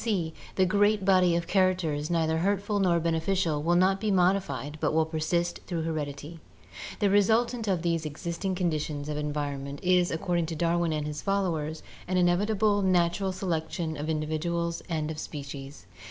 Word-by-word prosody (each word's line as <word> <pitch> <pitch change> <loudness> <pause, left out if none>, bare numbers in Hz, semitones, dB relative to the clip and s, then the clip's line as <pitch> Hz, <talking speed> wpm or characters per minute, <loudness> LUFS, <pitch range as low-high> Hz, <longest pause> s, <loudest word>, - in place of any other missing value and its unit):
c. 185 -8 -1 0.2
The 190 - +4
great 205 +1 +2
body 185 -3 +4
of 170 0 -1
characters 175 -6 +1
neither 160 -1 +1
hurtful 205 +3 0
nor 175 -3 +3
beneficial 165 -1 0
will 170 +3 +2
not 190 +2 +3
be 215 - 0
modified 175 -7 +1
but - - +1
will 160 0 +3
persist 170 +2 -1
through 170 -3 -2
heredity. 155 0 -4 0.6
"The 205 -2 +2
resultant 225 +3 +2
of 180 -4 0
these 165 -2 0
existing 170 +5 -3
conditions 155 -4 -2
[of 150 - -3
environment] 145 -2 -3
is, 180 -1 +3
according 170 0 -1
to 165 - -4
Darwin 170 +1 +1
and 150 -1 -2
his 150 -1 -4
followers, 165 -6 -1 0.2
an 185 - 0
inevitable 205 +4 +2
natural 185 0 +2
selec 175 -4 -2
tion 160 -3 -3
of 150 +2 -4
individuals 165 +2 -1
and 160 -2 -1
of 155 - -6
species. 140 - -7
170 Hz, 165 wpm, -28 LUFS, 155-185 Hz, 0.6 s, The